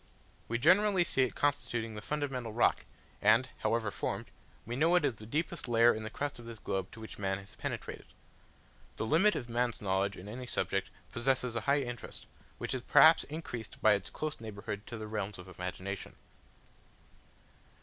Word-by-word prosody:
We 115 - 0
generally 185 - +5
see 135 - +1
it 130 - +1
constituting 120 -6 0
the 105 - -6
fundamental 135 -2 -2
rock, 120 - +2 0.4
and, 110 +5 +5
however 115 -3 0
formed, - - -3 0.3
we 120 +3 -3
know 165 +6 +4
it 175 -4 +4
is 130 - +2
the 110 0 -12
deepest 160 +4 -2
layer 120 0 +6
in 110 - -4
the 110 - -4
crust 145 +2 -4
of 120 - -10
this 115 -1 -8
globe 95 -3 -3
to - - -10
which 110 -2 -9
man 95 -1 0
has 95 0 -12
penetrated. - - -5 0.9
The - - -2
limit 180 - +4
of 120 - -3
man's 120 0 0
knowledge 100 0 0
in 95 - -9
any 125 +4 -6
subject - - -1 0.2
possesses 125 0 +1
a 115 - 0
high 140 +1 +4
interest, 120 -3 -6 0.3
which - - -3
is 130 - -2
perhaps 155 +6 +7
increased 140 -8 -6
by - - +6
its 100 -2 -2
close 155 -1 -4
neighbourhood 105 -1 -6
to 115 - -6
the 110 - -5
realms 105 -2 -3
of 90 0 -10
imagination. 95 +2 -5
115 Hz, 180 wpm, -32 LUFS, 105-140 Hz, 0.9 s, perhaps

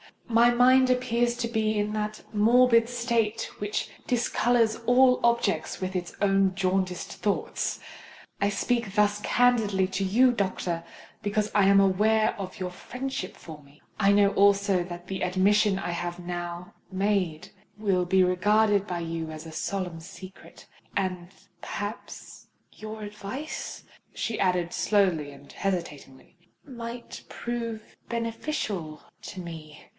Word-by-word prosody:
my 235 0 +5
mind 255 +2 +5
appears 240 -1 +1
to 240 -1 -2
be 220 -2 0
in 210 0 0
that 215 0 -3
morbid 230 +2 +5
state 235 -2 -1
which 205 +1 -2 0.2
discolours 235 -2 +2
all 250 +1 +5
objects 205 -10 +1
with 185 0 -3
its 180 -2 -4
own 195 -2 +3
jaundiced 185 -1 -1
thoughts. 205 -2 -2 0.6
I 200 - +2
speak 235 -1 -1
thus 210 -1 +3
candidly 220 -7 +2
to 195 +1 -2
you, 245 +7 +4
doctor—because 200 +1 -3
I 205 -2 +4
am 195 0 +6
aware 215 +3 +3
of 190 -1 -6
your 180 -1 -3
friendship 250 +2 -5
for 155 -3 -11
me—I 150 +8 -1
know 200 0 +5
also 200 -2 +3
that 175 0 -8
the 190 +1 -5
admission 195 +2 +3
I 195 -2 -3
have 175 0 -4
now 175 0 -6 0.2
made 190 -5 -1 0.3
will 195 -4 +1
be 185 +1 +4
regarded 205 +3 +3
by 175 -3 -3
you 165 -1 -4
as 155 +1 -8
a 160 - -8
solemn 180 0 -3
secret—and 185 0 -7 0.3
perhaps 205 +3 -7 0.2
your 215 0 -8
advice," 210 +8 -6 0.3
she 225 - -3
added, 180 -2 +1
slowly 185 -8 +1
and 140 0 -15
hesitatingly, 170 -6 -5 0.3
"might 235 -3 -8
prove 230 -2 -5
beneficial 230 - -3 0.2
to 190 - -7
me. 160 -3 -10
200 Hz, 130 wpm, -27 LUFS, 180-230 Hz, 0.6 s, am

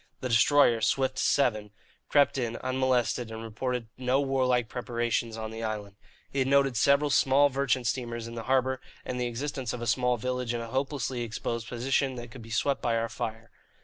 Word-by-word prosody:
The 130 - -2
destroyer, 115 0 +5
Swift 130 +1 +1
VII, 110 -7 +1 0.4
crept 145 -1 +3
in, 120 -2 -2
unmolested, 130 -2 +1
and 110 0 -7
reported 115 +1 -3
no 130 +1 +2
warlike 130 -3 +1
preparations 120 -2 -2
on 110 0 -5
the 110 0 -6
island. 105 -3 -4 0.4
It 135 -1 +1
noted 135 -2 +3
several 140 +4 +3
small 140 +2 +4
merchant 135 -2 0
steamers 120 -1 -2
in 115 - -8
the 115 -1 -6
harbour, 130 0 +2 0.2
and 125 0 -3
the 125 - 0
existence 130 +1 -3
of 125 - -5
a - - -2
small 125 +1 +2
village 125 0 -2
in - - -2
a 115 0 -6
hopelessly 135 -1 -2
exposed 115 0 -3
position 130 +2 0
that 120 -1 -8
could 125 - -10
be 115 - -12
swept 135 +5 0
by 115 -2 +1
our 115 0 -1
fire. 115 -2 -5
125 Hz, 185 wpm, -28 LUFS, 115-130 Hz, 0.4 s, destroyer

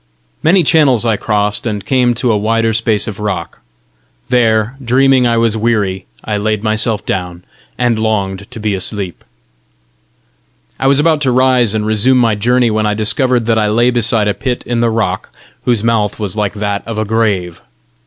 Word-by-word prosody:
Many 175 +3 +3
channels 140 -7 +3
I 115 -2 +2
crossed, 105 +1 -1
and 105 -3 -4
came 125 +1 +1
to 120 0 0
a - - +2
wider 115 +2 0
space 110 -1 0
of 105 -2 -6
rock; 100 -5 -4 0.7
there, 115 -1 +1
dreaming 130 +1 +3
I 115 0 +1
was 115 -1 +1
weary, 105 -5 -1 0.2
I 105 -1 -1
laid 105 0 -1
myself 110 -1 -1
down, 90 -2 -4 0.3
and 120 -3 +1
longed 100 -2 -2
to 125 - -9
be 105 -1 -1
awake. 95 -1 -3 1.6
I 135 - +1
was 140 +1 +3
about 155 0 +2
to 135 -3 +1
rise 125 -3 +2
and 105 -1 -1
resume 110 +4 +2
my 115 -3 +3
journey, 120 +3 +1
when 110 0 0
I 105 - 0
discovered 120 +3 +1
that 115 -1 +2
I 105 - +1
lay 120 +4 +2
beside 115 -3 +1
a 105 - +1
pit 125 +1 -3
in 120 -1 -2
the 120 0 +2
rock, 110 -5 -2 0.4
whose 120 -4 +1
mouth 115 -3 0
was 105 -3 -3
like 105 -1 -2
that 100 -1 -2
of 115 -2 -5
a 110 - -1
grave. 100 -6 -1
110 Hz, 185 wpm, -14 LUFS, 105-120 Hz, 1.6 s, Many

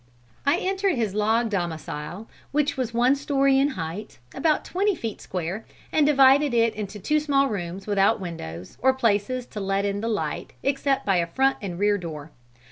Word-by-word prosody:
"I 280 - +4
entered 385 -1 0
his 220 -5 -1
log 220 +2 +1
domicile 170 +1 -4 0.2
which 290 0 +1
was 255 -3 -2
one 245 +3 +3
story 275 -1 +2
in 275 - +4
height, 170 +5 -5 0.2
about 315 -2 +1
twenty 395 +2 +1
feet 225 -8 -5
square 185 +4 -4 0.3
and 300 -2 +3
divided 275 -1 +5
into 215 -3 0
two 300 +10 +1
small 280 -2 +2
rooms 190 -2 -4
without 200 -2 +3
windows 95 - -7
or 265 +1 +4
places 235 +1 0
to 215 - -8
let 195 0 0
in 200 0 -1
the 225 - -2
light 215 -3 -3
except 275 0 0
by 195 -2 +3
a 170 -1 +1
front 265 +9 +2
and 185 -4 -5
rear 205 +1 +2
door. 160 -3 -7
220 Hz, 175 wpm, -25 LUFS, 190-275 Hz, 0.3 s, divided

